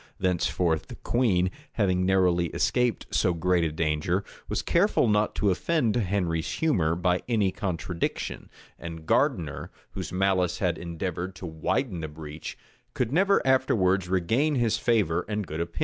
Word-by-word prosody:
Thenceforth 90 -2 0
the - - -9
queen, 95 -7 +1 0.2
having 95 -4 +1
narrowly 90 -2 +3
escaped 125 -2 +1
so 90 -4 +2
great 90 +1 +2
a 80 - 0
danger, 80 +4 0 0.3
was - - -1
careful 175 - +3
not 105 0 +2
to 100 - +2
offend 125 - +1
Henry's 90 -6 0
humor 90 - +1
by 90 +1 +1
any 105 -5 +2
contradiction; 90 -3 -3 0.3
and 80 -1 -8
Gardiner, 90 - 0 0.2
whose - - -5
malice 95 -1 +1
had - - 0
endeavored 90 +2 -4
to 95 - -8
widen 85 - -1
the 80 - -4
breach, 75 0 -8 0.4
could 125 -2 -1
never 195 +2 +3
afterwards 95 -9 +2
regain 115 - +1
his 115 -3 +2
favor 105 -8 +1
and 105 -1 -2
good 80 0 -4
opinion. 85 0 -5
95 Hz, 150 wpm, -27 LUFS, 85-110 Hz, 0.4 s, narrowly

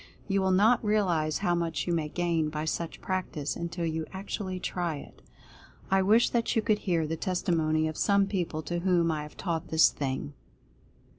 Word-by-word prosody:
You 195 -1 +1
will 190 - +2
not 210 +7 +4
realize 180 -8 +1
how 175 - +3
much 170 -2 -1
you 175 - 0
may 155 -2 -1
gain 170 -2 0
by 155 0 -3
such 165 +1 -3
practice, 160 -7 -2
until 170 0 -3
you 160 -1 -2
actually 190 -1 -4
try 175 -3 -2
it. 140 - -11 0.7
I 195 0 +4
wish 215 +5 +4
that 235 -1 0
you 225 - +2
could 210 -1 +2
hear 170 -6 0
the 160 +1 -2
testimony 160 -3 0
of 155 - -4
some 200 +2 +3
people 175 -5 -2
to 175 +2 -2
whom 175 -2 +2
I 155 -1 -2
have 150 0 -10
taught 165 -4 -2
this 160 0 +5
thing. 140 +1 -3
170 Hz, 190 wpm, -28 LUFS, 155-190 Hz, 0.7 s, this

